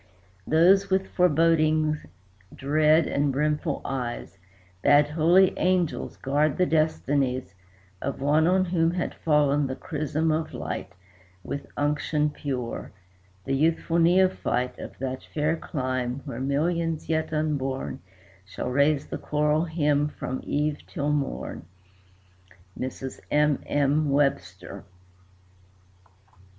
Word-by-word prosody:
Those, 190 Hz, +5 st, +4 dB
with 190 Hz, 0 st, +1 dB
forebodings 155 Hz, -3 st, +2 dB, 0.5 s
dread 155 Hz, +3 st, +3 dB
and 140 Hz, 0 st, 0 dB
brimful 150 Hz, +2 st, -1 dB
eyes, 120 Hz, -7 st, -4 dB, 0.4 s
Bade 145 Hz, 0 st, +5 dB
holy 170 Hz, +5 st, +4 dB
angels 180 Hz, -4 st, 0 dB
guard 145 Hz, +2 st, 0 dB
the 180 Hz, -, +3 dB
destinies 145 Hz, -, 0 dB, 0.5 s
Of 140 Hz, -, -3 dB
one 150 Hz, +4 st, +3 dB
on 185 Hz, +1 st, +3 dB
whom 170 Hz, -2 st, +1 dB
had 180 Hz, -, -2 dB
fallen 145 Hz, -2 st, +2 dB
the 130 Hz, -, -4 dB
chrism 155 Hz, +2 st, -2 dB
of 155 Hz, 0 st, -2 dB
light 95 Hz, -, -5 dB, 0.5 s
With 140 Hz, -, -5 dB
unction 150 Hz, +1 st, 0 dB
pure; 130 Hz, -5 st, -5 dB, 0.5 s
the 135 Hz, -, -1 dB
youthful 165 Hz, +3 st, +1 dB
neophyte 175 Hz, -7 st, +2 dB
Of -, -, -9 dB
that 130 Hz, 0 st, -4 dB
fair 150 Hz, +1 st, +1 dB
clime 130 Hz, -4 st, -3 dB
where 115 Hz, -, -6 dB
millions 160 Hz, +4 st, -1 dB
yet 160 Hz, -1 st, -1 dB
unborn 140 Hz, -4 st, -2 dB, 0.4 s
Shall 100 Hz, +6 st, -5 dB
raise 140 Hz, +2 st, +2 dB
the -, -, -6 dB
choral 150 Hz, +2 st, +1 dB
hymn 150 Hz, -3 st, +1 dB
from 130 Hz, -3 st, -5 dB
eve 150 Hz, 0 st, -1 dB
till 145 Hz, +1 st, -2 dB
morn. 140 Hz, -, -3 dB, 1.1 s
MRS. 130 Hz, +1 st, -6 dB
M. 150 Hz, -1 st, +2 dB
M. 145 Hz, +1 st, +1 dB
WEBSTER. 135 Hz, -9 st, -1 dB
150 Hz, 115 wpm, -26 LUFS, 135-160 Hz, 1.1 s, Bade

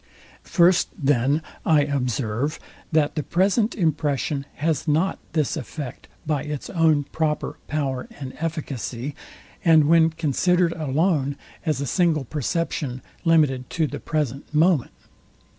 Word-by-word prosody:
First 175 Hz, +1 st, +4 dB
then 140 Hz, +1 st, +2 dB, 0.2 s
I 155 Hz, -2 st, +4 dB
observe, 130 Hz, -1 st, -1 dB, 0.3 s
that 155 Hz, -2 st, +2 dB
the 155 Hz, -, -1 dB
present 200 Hz, -, +1 dB
impression 150 Hz, -, 0 dB
has 155 Hz, +1 st, -1 dB
not 160 Hz, +6 st, +1 dB
this 155 Hz, -4 st, +1 dB
effect 145 Hz, -2 st, -7 dB, 0.2 s
by 150 Hz, -3 st, 0 dB
its 150 Hz, -1 st, -5 dB
own 160 Hz, -4 st, +3 dB
proper 150 Hz, +1 st, -2 dB
power 135 Hz, -4 st, -2 dB
and 130 Hz, -2 st, -6 dB
efficacy, 145 Hz, -5 st, -4 dB, 0.5 s
and 160 Hz, -3 st, +6 dB
when 165 Hz, 0 st, +5 dB
considered 165 Hz, +3 st, +1 dB
alone, 150 Hz, -1 st, 0 dB, 0.3 s
as 150 Hz, -3 st, +1 dB
a -, -, -1 dB
single 160 Hz, +1 st, +2 dB
perception, 145 Hz, -2 st, -2 dB, 0.2 s
limited 145 Hz, -6 st, +3 dB
to 160 Hz, -, +3 dB
the -, -, -5 dB
present 145 Hz, -3 st, -3 dB
moment. 155 Hz, -2 st, +3 dB
150 Hz, 125 wpm, -24 LUFS, 140-165 Hz, 0.5 s, and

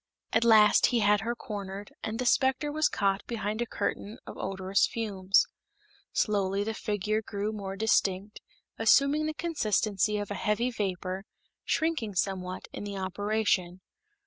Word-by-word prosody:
At 225 Hz, -, +4 dB
last 215 Hz, -2 st, +6 dB
he 240 Hz, -2 st, +1 dB
had 205 Hz, 0 st, +4 dB
her 235 Hz, +2 st, -2 dB
cornered, 200 Hz, -3 st, -7 dB
and 220 Hz, 0 st, -3 dB
the 255 Hz, -, -2 dB
specter 265 Hz, +4 st, +2 dB
was 310 Hz, 0 st, +2 dB
caught 195 Hz, 0 st, 0 dB
behind 215 Hz, -1 st, -3 dB
a 240 Hz, -, -1 dB
curtain 215 Hz, +1 st, -3 dB
of -, -, -8 dB
odorous 195 Hz, 0 st, 0 dB
fumes. 195 Hz, -4 st, +1 dB, 0.7 s
Slowly 200 Hz, -2 st, +1 dB
the 220 Hz, +2 st, -2 dB
figure 215 Hz, 0 st, -1 dB
grew 205 Hz, 0 st, -3 dB
more 195 Hz, -3 st, -5 dB
distinct, 200 Hz, -1 st, 0 dB, 0.4 s
assuming 280 Hz, +7 st, +4 dB
the 310 Hz, -, -3 dB
consistency 215 Hz, -, 0 dB
of 205 Hz, -1 st, -4 dB
a 200 Hz, -, -4 dB
heavy 235 Hz, +4 st, +1 dB
vapor, 190 Hz, -3 st, -3 dB, 0.4 s
shrinking 310 Hz, -, 0 dB
somewhat 185 Hz, 0 st, -2 dB
in -, -, -6 dB
the 200 Hz, -1 st, -5 dB
operation. 190 Hz, -1 st, -1 dB
210 Hz, 145 wpm, -29 LUFS, 195-225 Hz, 0.7 s, last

